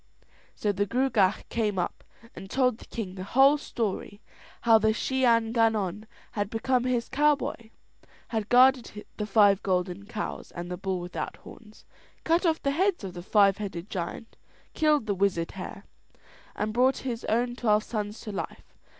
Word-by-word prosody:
So 210 - 0
the 205 +1 -1
Gruagach 225 -4 +1
came 210 -4 -1
up 175 - -3 0.3
and 190 +2 -9
told 250 -2 +1
the - - -12
king 200 -6 -5
the 185 -1 -7
whole 270 +8 +5
story, 205 -5 -4 0.4
how 225 -1 +6
the 220 0 +2
Shee 265 +3 0
an 230 -2 +3
Gannon 220 -3 +1 0.2
had 205 -2 -2
become 250 +2 0
his 245 -2 0
cowboy, 280 -5 0 0.6
had 220 -2 -2
guarded 250 -4 +4
the 210 - -3
five 205 -1 +5
golden 185 +1 -1
cows 215 -2 -5
and 175 +1 -6
the - - -2
bull 190 -1 -3
without 175 -3 -5
horns, 215 -1 -15 0.4
cut 335 +2 +2
off 320 -1 0
the 275 - +1
heads 365 - +1
of 190 -2 -6
the 175 - -7
five 200 +1 +3
headed 195 -2 -6
giant, 180 +4 -5 0.4
killed 300 -5 +2
the 205 - 0
wizard 190 -4 0
hare, 195 +1 -8 0.7
and 215 0 -2
brought 255 +3 +3
his 240 -3 -3
own 240 +2 0
twelve 215 -4 +2
sons 210 -1 -4
to 215 - -6
life. 200 - -7
215 Hz, 165 wpm, -27 LUFS, 195-245 Hz, 0.7 s, how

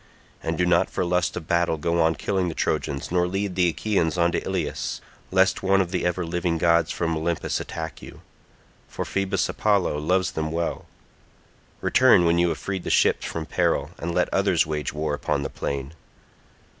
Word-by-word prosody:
And 80 0 -2
do 90 - +2
not 90 -1 +3
for 90 - -2
lust 90 +1 0
of 80 - -7
battle 85 -2 +1
go 85 +3 0
on 80 0 +3
killing 95 +1 -1
the 80 - -6
Trojans 70 +3 -2
nor 90 0 +2
lead 95 +1 -2
the 90 -1 +3
Achaeans 85 -2 0
on 85 0 +3
to - - -2
Ilius, 90 -6 -3 0.3
lest 95 0 +3
one 95 0 +3
of 90 -2 0
the 90 -2 0
ever 90 0 -1
living 85 0 -1
gods 85 +1 +3
from 85 -1 -1
Olympus 80 +1 -1
attack 80 -3 -6
you—for - - -11
Phoebus 95 -1 0
Apollo 100 -8 +1
loves 90 +3 +1
them 80 0 -3
well: 85 +1 -3 0.9
return 125 -9 +5
when 85 +1 +3
you 85 0 +3
have - - -2
freed 95 -3 -4
the - - -4
ships - - +3
from 80 -1 -4
peril, - - 0
and 85 - -3
let - - 0
others - - +3
wage 75 -2 -3
war 75 -1 -2
upon 70 -1 -1
the - - -4
plain. 70 +1 -4
85 Hz, 185 wpm, -24 LUFS, 80-90 Hz, 0.9 s, return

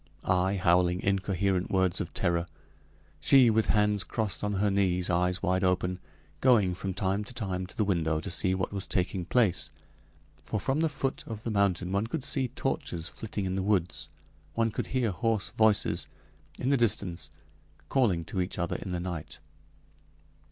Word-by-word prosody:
I, 95 +1 +2
howling 90 -1 +3
incoherent 95 -1 0
words 95 -2 +1
of 90 - -5
terror; 85 -2 0 0.7
she, 130 -4 +6
with 110 0 +2
hands 105 -1 +2
crossed 105 -8 -2
on 105 0 0
her 100 +1 +1
knees, 90 -2 +1
eyes 90 +2 +1
wide 95 0 +1
open, 90 0 +1 0.4
going 110 -8 +4
from 95 0 -4
time 100 +1 0
to 125 +3 -11
time 95 -6 -3
to 130 - -17
the 110 - +2
window 80 -5 +1
to 90 +4 -5
see 95 +1 +1
what 95 +1 -2
was 100 -1 -4
taking 90 0 -1
place, 100 -2 +2 0.7
for 110 - -2
from 135 +8 0
the 160 0 +2
foot 135 -2 -3
of 110 -2 -6
the 115 - -2
mountain 95 -3 +1
one 100 +3 0
could 135 +3 -3
see 135 -2 0
torches 105 -9 -3
flitting 105 -3 -5
in 95 - -2
the 95 - -1
woods. 95 -4 0 0.5
One 115 -1 +1
could - - -3
hear 125 -5 0
hoarse 105 +3 -1
voices, 110 -2 +2 0.5
in 130 - -1
the 140 - +4
distance, 100 -7 0 0.6
calling 100 -11 +2
to 95 +3 -2
each 90 - -3
other 85 -2 -1
in - - -7
the 90 -1 -2
night. 85 -3 -5
95 Hz, 175 wpm, -29 LUFS, 90-110 Hz, 0.7 s, she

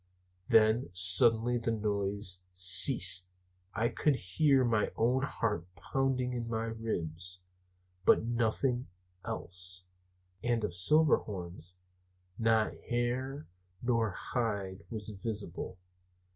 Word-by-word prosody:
Then 110 0 +3
suddenly 115 +6 +3
the 115 - -3
noise 100 -3 -1
ceased. 90 +1 +7 0.5
I 115 +1 0
could 150 -3 0
hear 130 - +1
my 115 -3 0
own 125 +4 +1
heart 105 -9 -3
pounding 130 0 -2
at 120 -1 -4
my 115 -1 -3
ribs, 90 -6 -5 0.6
but - - +4
nothing 120 +2 -1 0.4
else. 90 0 -5 0.6
And 120 -2 -1
of 105 - -2
Silverhorns 90 - +1 0.6
not 110 -1 +1 0.2
hair 130 +4 -2 0.4
nor 115 -3 +1
hide 100 -2 -4
was 110 -2 -5
visible. 100 -3 -5
110 Hz, 100 wpm, -31 LUFS, 95-120 Hz, 0.6 s, ceased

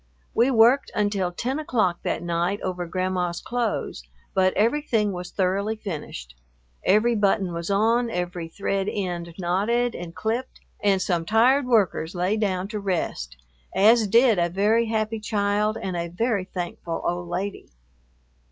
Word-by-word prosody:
We 235 +3 +3
worked 245 +2 +5
until 205 -3 0
ten 255 +10 -2
o'clock 215 - 0
that 165 - -2
night 175 +3 -1
over 180 -2 -3
Grandma's 180 -1 -1
clothes, 235 - -2 0.3
but 185 0 +3
everything 225 -2 +1
was 180 -1 -6
thoroughly 200 +4 0
finished. 155 - -7 0.5
Every 215 +5 +4
button 200 -3 +1
was 170 +1 -4
on, 230 +4 +2
every 175 -3 -3
thread 195 +3 -2
end 175 -4 -4
knotted 205 +7 +1
and 170 -1 -8
clipped, 235 +4 -3 0.2
and 200 -2 +3
some 175 -3 0
tired 250 +8 +3
workers 195 -7 +1
lay 180 +4 +1
down 195 -3 -1
to 210 -1 -4
rest, 160 - -3 0.4
as 220 +3 +5
did 230 -1 +5
a 170 0 +2
very 215 +6 +2
happy 220 0 -1
child 210 0 0
and 190 -4 -4
a 170 0 -2
very 200 +2 -1
thankful 175 -2 -5
old 175 0 -2
lady. 190 +3 -4
200 Hz, 145 wpm, -24 LUFS, 175-225 Hz, 0.5 s, worked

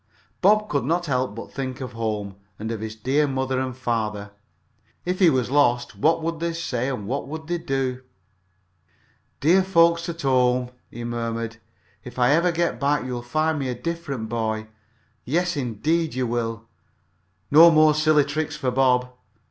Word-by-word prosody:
Bob 210 +2 +4
could 145 -8 -1
not 170 +6 0
help 130 -6 -1
but 115 - -9
think 130 -2 -4
of 130 -2 -6
home, 105 -3 -3 0.2
and 110 +2 -5
of 110 -2 -4
his 110 0 -5
dear 135 +7 +1
mother 130 -1 -1
and 130 -1 -3
father. 105 -5 -2 0.7
If 180 +1 -2
he 180 -4 +6
was 130 -4 0
lost, 120 -6 +2
what 160 +10 +2
would 165 0 -2
they 170 0 -2
say 135 -7 -2
and 125 -7 -4
what 130 +5 -3
would 160 +2 -7
they 175 +1 -2
do? 130 -3 -2 1.4
"Dear 175 +6 +5
folks 170 -2 +3
at 165 -1 -6
home!" 125 -2 +2 0.2
he 120 - -8
murmured. 115 -1 -3 0.5
"If - - -11
I 125 +1 +4
ever 170 +4 +3
get 170 0 -1
back 145 -1 +1
you'll 125 -1 -4
find 155 +5 0
me 135 -2 -2
a 125 - -2
different 160 -9 -4
boy, 110 -1 -2 0.5
yes, 175 +6 0
indeed, 145 +5 -1
you 130 0 0
will! 115 -1 -3 0.9
No 160 +4 +9
more 155 -1 +5
silly 155 -1 +4
tricks 150 +2 -3
for 130 - -1
Bob!" 125 -1 +3
130 Hz, 170 wpm, -23 LUFS, 120-160 Hz, 1.4 s, No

